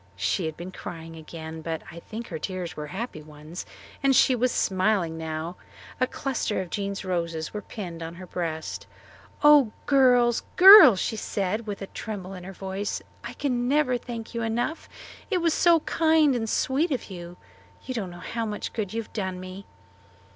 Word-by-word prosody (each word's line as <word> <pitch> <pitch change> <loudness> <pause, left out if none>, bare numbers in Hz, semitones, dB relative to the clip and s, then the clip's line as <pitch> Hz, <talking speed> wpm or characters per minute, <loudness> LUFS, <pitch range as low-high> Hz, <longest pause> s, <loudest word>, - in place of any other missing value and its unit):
She 165 - 0
had 155 - -6
been 175 +2 -7
crying 165 -2 -8
again, 160 0 -8
but 160 0 -4
I 170 - -9
think 225 +6 -8
her 160 - -5
tears 180 -1 -4
were 150 0 -5
happy 190 -1 -5
ones; 155 +3 -9 0.3
and 275 -1 +4
she 260 - +5
was 250 0 +1
smiling 190 -3 +1
now. 160 +2 -5 0.4
A 255 - +2
cluster 260 -6 -2
of 185 -2 -5
Jean's 200 -1 -3
roses 170 -3 -2
were 210 - -4
pinned 175 -5 -7
on 165 +1 -6
her 185 +1 -9
breast. 165 -3 -4 0.6
"Oh, 295 -6 +7
girls, 245 -4 +4
girls," 375 - +10
she 220 - -1
said, 215 +2 -2
with 205 -1 -5
a - - -3
little 195 - -10
tremble 195 -4 -6
in 180 -1 -9
her 190 - -7
voice, 195 +2 -4 0.2
"I - - -6
can 245 -4 -1
never 275 -2 +2
thank 235 -1 -6
you 235 - -2
enough. 240 +8 -2 0.4
It 385 - +2
was 335 -2 +2
so 335 -1 +4
kind 315 -3 +3
and 225 -3 -2
sweet 280 +10 +1
of 255 -7 -3
you. 175 -1 -8 0.5
You 260 - -4
don't 210 -7 -3
know 175 - -10
how 225 +5 -4
much 210 -1 -5
good 215 -3 -3
you 230 - -1
have - - -22
done 190 -4 -3
me." 185 +1 -9
200 Hz, 190 wpm, -26 LUFS, 175-245 Hz, 0.6 s, girls